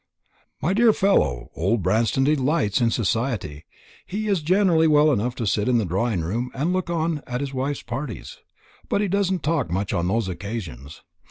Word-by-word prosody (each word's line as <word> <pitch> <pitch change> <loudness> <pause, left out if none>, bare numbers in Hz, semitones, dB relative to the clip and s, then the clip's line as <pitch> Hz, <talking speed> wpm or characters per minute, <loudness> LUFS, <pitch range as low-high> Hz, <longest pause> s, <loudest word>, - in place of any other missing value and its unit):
"My 175 - +2
dear 225 +1 +5
fellow, 70 - +1
old 95 +4 0
Branston 115 +8 +2
delights 140 -5 +1
in 115 - +3
society. 110 - -2 0.4
He 215 +3 -4
is 195 -5 +1
generally 170 -1 +3
well 150 0 +5
enough 120 0 -1
to 115 - -3
sit 105 +1 0
in 125 -1 +3
the 110 - +1
drawing 95 +2 -1
room 115 +10 -2
and 155 +7 0
look 185 -2 -2
on 165 -2 -1
at 125 -1 -3
his 140 -1 -4
wife's 135 +2 -2
parties. 120 - -6 0.6
He 205 0 +1
doesn't 190 -2 0
talk 150 - 0
much 95 +3 -2
on 85 0 0
those 110 +2 0
occasions. 90 - -7
125 Hz, 175 wpm, -23 LUFS, 100-160 Hz, 0.6 s, dear